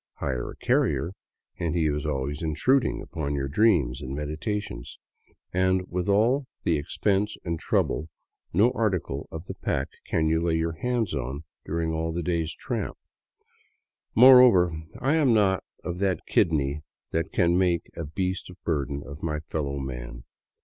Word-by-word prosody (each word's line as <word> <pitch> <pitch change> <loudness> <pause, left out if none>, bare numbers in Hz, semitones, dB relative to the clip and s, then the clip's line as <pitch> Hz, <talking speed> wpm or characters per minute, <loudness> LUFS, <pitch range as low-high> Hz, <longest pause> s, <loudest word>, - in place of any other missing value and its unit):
Hire 65 -3 -3
a - - -8
carrier 85 - +1 0.5
and 85 -1 -1
he 85 -2 +2
is 75 0 0
always 70 0 -2
intruding 120 - +1
upon 70 -2 -3
your 70 -1 -1
dreams 70 - +2
and 65 0 -5
meditations, 75 - -4 0.6
and 95 0 +2
with 90 +2 -1
all 120 +7 +3 0.2
the 85 - +2
expense 100 +7 0
and 85 -2 -2
trouble 80 +1 0 0.4
no 105 +8 +4
article 90 - -1
of 80 +1 -7
the - - -5
pack 65 +1 -2 0.2
can 80 - +1
you 80 +1 +2
lay 85 -1 +1 0.2
hands 120 -7 0
on 70 +2 -3 0.2
during 80 0 -1
all 80 +1 -1
the 85 +1 -3
day's 80 -2 -1
tramp. - - -4 1.2
Moreover, 120 -8 +8 0.3
I 135 +3 +2
am 135 -7 +4
not 95 -3 +3 0.2
of 90 0 -4
that 95 -2 0
kidney 75 -3 +2 0.3
that 80 0 -1
can 85 -1 +3
make 90 -2 +2
a 85 - -4
beast 90 +6 -3
of 90 - -12
burden 70 -3 -1
of 75 +2 -9
my 75 -2 -2
fellow 75 -3 -3
man. - - -6
80 Hz, 155 wpm, -26 LUFS, 75-95 Hz, 1.2 s, Moreover